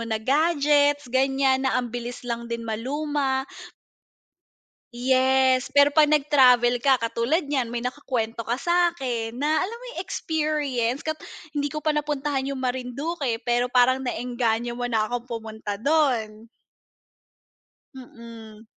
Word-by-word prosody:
na 220 - 0
gadgets 290 +3 +2
gan'yan, 270 0 +2
na - - +1
ang 245 -2 -3
bilis 245 +1 -6
lang 235 -1 -4
din 235 0 -4
maluma. 265 +4 -2 1.5
Yes 260 +1 +2
pero 285 +1 +4
pag 305 -1 +5
nag 300 -1 +1
travel 245 -3 +5
ka 265 +1 +4
katulad 235 +8 -1
niyan 275 -4 -1
may 240 +1 -4
nakukuwento 250 -4 -3
ka 230 +2 -2
sa'kin, 270 -8 0
na 300 +4 +1
alam 450 +5 -3
mo - - -13
yung - - -6
experience 300 -8 -2
kapag 315 0 -5 0.2
hindi 290 0 -1
ko 305 +2 -6
pa 310 - +2
napuntahan 290 -2 -2
yung 275 - -3
Marindoque, 255 +2 -2
pero 240 0 +1
parang 250 +1 +3
na-engganyo 240 -2 -2
mo 245 0 -3
na 220 -3 +1
akong 245 +2 -5
pumunta 220 -3 -5
do'n. 230 -5 0 1.5
Mm. 230 -3 -12
260 Hz, 135 wpm, -24 LUFS, 235-290 Hz, 1.5 s, pag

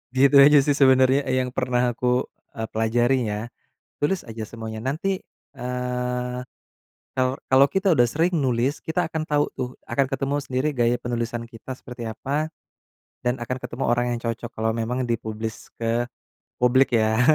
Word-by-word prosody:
Gitu 140 +2 +5
aja, 150 +1 +7
sih, 145 - +3
sebenarnya 130 0 +6 0.2
yang 125 0 -1
pernah 125 -1 +1
aku 120 +1 -5 0.5
e - - -3
pelajari, 120 +3 +2 0.2
ya. 105 - -2 0.7
Tulis 190 +5 +2
aja 110 0 -5
semuanya. 110 0 -6
Nanti, 185 +7 -1 0.4
eee, 125 0 -2 0.8
kalau 130 0 +2 0.2
kalau 135 +1 +7
kita 195 0 +2
udah 120 - +6
sering 165 +8 +1
nulis, 130 0 +1
kita 160 +1 0
akan 160 -1 -2
tahu, 145 -1 +2
tuh, 125 - -2 0.2
akan 140 - +2
ketemu 135 +2 0
sendiri 130 +2 0
gaya 120 0 +3
penulisan 120 -1 -3
kita 115 +2 -8
seperti 125 -2 -8
apa, 140 +8 -2 0.7
dan 125 0 0
akan 125 +1 -4
ketemu 125 +3 -4
orang 120 +1 +2
yang 115 - -7
cocok 115 +1 -3
kalau 110 0 0
memang 115 +3 -1
di-publish 110 -2 -4
ke 115 +1 0 0.5
publik, 125 +2 +4
ya, 110 +1 +2
125 Hz, 155 wpm, -24 LUFS, 115-135 Hz, 0.8 s, aja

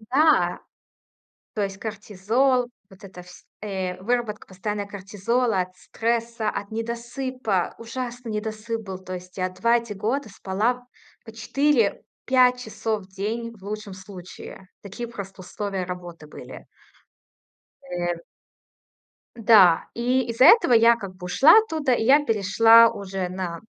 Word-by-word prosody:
Да. 250 - +2 0.9
То 210 - -1
есть 195 -1 -6
кортизол, 220 +5 0 0.2
вот 195 +2 -17
эта 185 -2 -11
вс 180 0 -16 0.2
э, 190 -3 -4
выработка 225 0 -2
постоянно 205 +2 -4
кортизола, 205 +3 -1
от 185 0 -12
стресса, 230 +2 -2
от 200 -1 -4
недосыпа, 235 -2 -3
ужасный 240 0 -6
недосып 220 +1 -4
был. 190 -3 -7
То 185 0 -8
есть 180 0 -10
я 185 0 0
2 230 +6 +2
эти 230 -2 -7
года 225 +7 -2
спала 215 +5 -2 0.4
по 225 - -11
4-5 250 +1 +1
часов 220 -1 -3
в - - -20
день 220 +5 -4
в 190 - -22
лучшем 210 -1 -6
случае. 185 0 -11
Такие 215 +4 -7
просто 195 -4 -9
условия 190 +1 -4
работы 175 -3 -8
были. - - -11 1.2
Э. 175 -9 -3 1.2
Да, 210 -7 +5
и 250 +2 +1
из-за 230 +3 +3
этого 350 - +7
я 230 +1 +6
как 195 -5 -9
бы 180 - -11
ушла 275 - +6
оттуда, 320 -11 0
и 235 - +1
я 285 +5 +5
перешла 225 +2 +6
уже 195 -3 -4
на 180 -2 -5
215 Hz, 135 wpm, -24 LUFS, 190-235 Hz, 1.2 s, этого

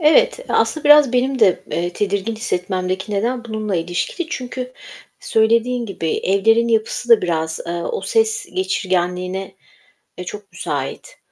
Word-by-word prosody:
Evet, 485 +12 +4
aslında 315 - +1
biraz 295 -3 +7
benim 260 +2 +1
de, 200 -6 +4
eee, 175 +1 -1
tedirgin 200 +2 -1
hissetmemdeki 185 -2 -2
neden 235 +4 -1
bununla 215 -4 -2
ilişkili. 175 - -2
Çünkü 255 0 -5 0.5
söylediğin 230 +2 +2
gibi 170 -5 -3
evlerin 225 +5 +3
yapısı 225 +1 0
da 230 -4 +6
biraz, 160 -2 -1
eee, 170 - -3
o 175 - -3
ses 445 -1 +1
geçirgenliğine, 185 - -1 0.6
eee, 180 - -5
çok 205 +2 -8
müsait. - - -5
220 Hz, 135 wpm, -20 LUFS, 185-250 Hz, 0.6 s, biraz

